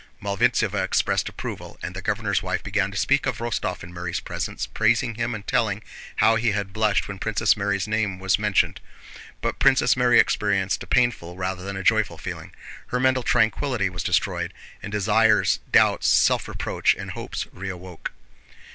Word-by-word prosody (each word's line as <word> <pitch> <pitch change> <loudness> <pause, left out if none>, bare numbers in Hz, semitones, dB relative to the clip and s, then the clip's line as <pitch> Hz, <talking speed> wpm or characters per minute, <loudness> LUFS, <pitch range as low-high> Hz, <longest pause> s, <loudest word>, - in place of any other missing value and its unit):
Malvíntseva 100 -1 +1
expressed - - +1
approval, - - -7
and 90 - -5
the 95 - -5
governor's 100 -2 0
wife 90 0 -2
began 100 -2 0
to 100 - -7
speak 140 +5 +2
of 130 - -1
Rostóv 115 -5 -3
in 85 +1 -10
Mary's 85 0 -3
presence, - - -4
praising 115 +2 +1
him 115 +1 -2
and 105 -1 -8
telling 110 -2 0 0.3
how 115 +1 +4
he 115 -1 +1
had 100 -2 -3
blushed 105 -1 +1
when 100 -1 -7
Princess 110 +1 +2
Mary's 100 -1 -1
name 105 -3 -1
was 95 +1 +1
mentioned. 105 -2 +1 0.6
But - - -2
Princess 130 -4 +4
Mary 125 -1 +4
experienced 100 -2 +1
a - - -8
painful 120 -9 +1
rather 95 0 -3
than 100 0 -5
a 95 - -5
joyful - - +2
feeling—her 125 - -7
mental 130 0 +2
tranquillity 110 -2 +1
was 85 - -4
destroyed, - - -1 0.3
and 105 - -7
desires, 105 +1 +3
doubts, - - +4
self - - +3
reproach, - - 0
and - - -7
hopes - - -5
reawoke. 90 -2 -7
105 Hz, 165 wpm, -24 LUFS, 95-115 Hz, 0.6 s, how